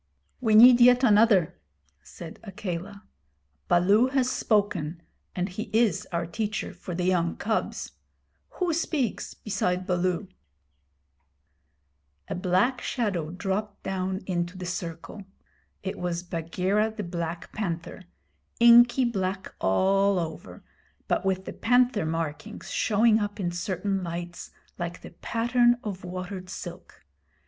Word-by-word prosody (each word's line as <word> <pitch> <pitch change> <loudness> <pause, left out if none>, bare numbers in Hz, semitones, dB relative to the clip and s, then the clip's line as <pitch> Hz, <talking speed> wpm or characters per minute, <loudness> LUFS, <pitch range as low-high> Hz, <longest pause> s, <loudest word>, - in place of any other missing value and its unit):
'We 220 -4 +2
need 240 +2 +9
yet 250 +1 +6
another,' 210 - +4 0.4
said 160 - -11
Akela. 195 -1 -6 0.6
'Baloo 200 +7 +4
has 260 -1 +1
spoken, 185 - 0 0.4
and 180 0 -1
he 205 +3 -6
is 220 -5 +2
our 170 -1 -1
teacher 210 +5 -3
for 180 - -7
the 180 - -2
young 175 -2 +1
cubs. 220 +1 -2 0.7
Who 360 -3 0
speaks 305 - -2
beside 185 -3 -2
Baloo?' 180 +2 0 2.0
A - - -3
black 185 +8 +1
shadow 195 - -2
dropped 200 +3 -4
down 190 0 -3
into 175 0 -2
the 185 - -6
circle. 175 +2 -6 0.6
It 190 - -4
was 175 -1 -2
Bagheera 180 +5 -1
the 210 - -3
Black 170 -1 -5
Panther, 175 -5 -4 0.6
inky 240 +2 +7
black 190 -4 -2
all 195 - +2
over, 160 - -6 0.4
but - - 0
with 190 0 -1
the - - -6
panther 245 -6 +2
markings 165 +6 -4
showing 220 +1 +3
up 205 0 -4
in 175 -3 -1
certain 190 +2 -2
lights 175 0 -6 0.3
like 175 0 -4
the - - -11
pattern 240 +1 +2
of 195 -3 -5
watered 185 +1 -6
silk. 175 - -9
190 Hz, 120 wpm, -26 LUFS, 175-220 Hz, 2.0 s, need